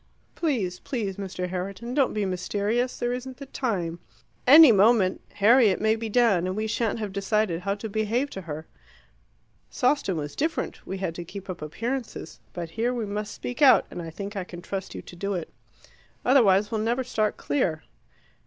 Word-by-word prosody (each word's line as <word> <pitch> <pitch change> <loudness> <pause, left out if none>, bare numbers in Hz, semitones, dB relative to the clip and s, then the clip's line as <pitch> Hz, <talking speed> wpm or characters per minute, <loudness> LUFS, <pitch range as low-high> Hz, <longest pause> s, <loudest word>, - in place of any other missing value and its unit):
Please, 220 - -1
please 210 -7 -3
Mr. 185 -2 -4
Herriton, 195 +6 -4
don't 270 -4 +2
be 210 -1 0
mysterious: 205 +6 -1
there 240 0 -1
isn't 255 +1 -6
the 275 - -8
time. 185 -11 -2 0.5
Any 300 0 +10
moment 205 -2 +4
Harriet 220 -1 +5
may 220 +1 +3
be 225 0 -4
down, 205 -6 +3
and 185 - -2
we 215 +1 -1
shan't 225 0 -1
have 210 -3 -4
decided 200 -3 0
how 200 +2 -1
to 210 +2 -6
behave 220 +6 -1
to 195 - -6
her. 160 -2 -6 1.0
Sawston 250 -7 +1
was 145 -2 -4
different: 320 +3 -2
we 190 - -4
had 190 -3 -3
to 175 - -6
keep 190 +2 -7
up 175 - -9
appearances. 230 - -5
But 170 -2 -6
here 235 +5 -1
we 235 -3 -2
must 210 +1 -4
speak 245 +4 -6
out, 275 -3 +7
and 175 - -5
I 165 - -6
think 200 +5 -7
I 195 - -2
can 175 -1 -10
trust 195 -1 -5
you - - -7
to - - -12
do 200 +2 -2
it. 170 -3 -5 0.7
Otherwise 210 -6 +4
we'll 220 -1 0
never 240 +4 0
start 215 -4 -1
clear." 165 - -1
210 Hz, 185 wpm, -26 LUFS, 185-240 Hz, 1.0 s, Any